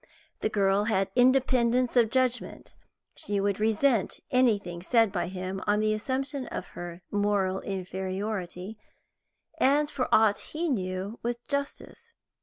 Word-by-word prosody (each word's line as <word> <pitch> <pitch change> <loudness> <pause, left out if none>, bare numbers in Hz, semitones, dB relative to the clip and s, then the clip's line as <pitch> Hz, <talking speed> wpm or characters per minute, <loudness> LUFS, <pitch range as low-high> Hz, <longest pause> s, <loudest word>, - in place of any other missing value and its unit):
The - - 0
girl 200 -1 +2
had 195 -3 +1
independence 250 -1 +3
of 235 -3 +5
judgment; 255 0 -1 0.4
she 205 -1 -2
would 200 0 0
resent 220 +1 +1
anything 205 -9 +2
said 225 +2 +3
by 180 -3 -2
him 185 +1 -5
on 205 0 +3
the 215 0 +2
assumption 265 +5 -2
of - - -6
her 175 0 -8
moral 205 -2 +1
inferiority, 190 +1 -4 0.8
and, 295 +2 +3
for 255 -3 -2
aught 215 -2 +4
he 330 +2 -3
knew, 190 -2 -3
with 240 0 -4
justice. 290 +11 -5
215 Hz, 130 wpm, -28 LUFS, 195-255 Hz, 0.8 s, of